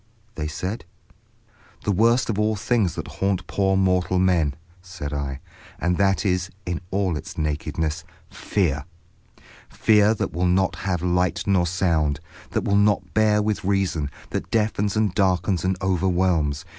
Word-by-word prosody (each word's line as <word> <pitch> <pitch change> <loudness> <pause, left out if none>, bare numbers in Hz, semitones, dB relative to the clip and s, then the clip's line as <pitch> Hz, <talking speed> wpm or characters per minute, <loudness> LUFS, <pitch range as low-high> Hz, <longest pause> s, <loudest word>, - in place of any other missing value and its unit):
they 75 -6 -3
said. 90 +8 -4 1.0
"The 105 - +1
worst 115 +6 +3
of 105 - -3
all 110 0 +2
the - - -7
things 105 -7 +1
that - - -5
haunt 95 -2 -1
poor 95 -1 +1
mortal 95 -1 +2
men," 85 -6 +2 0.3
said 90 -5 -7
I; 70 -1 -4 0.4
"and 90 +1 0
that 95 0 +2
is, 90 -1 0 0.2
in 90 0 -3
all 95 -3 0
its 75 - -7
nakedness—'Fear!' 80 +1 -2 0.8
Fear 105 0 +4
that 100 - -3
will 90 +3 +1
not 95 +1 +2
have 90 -3 -2
light 90 +2 +1
nor 95 -3 +2
sound, 80 -5 +1 0.3
that - - -1
will 100 - +1
not 105 0 +2
bear 105 -1 +3
with 105 -1 -1
reason, 95 -6 0 0.2
that - - -3
deafens 105 -2 0
and 105 -4 +1
darkens 95 -1 +1
and 95 0 0
overwhelms. 90 -5 +1
95 Hz, 150 wpm, -23 LUFS, 85-100 Hz, 1.0 s, Fear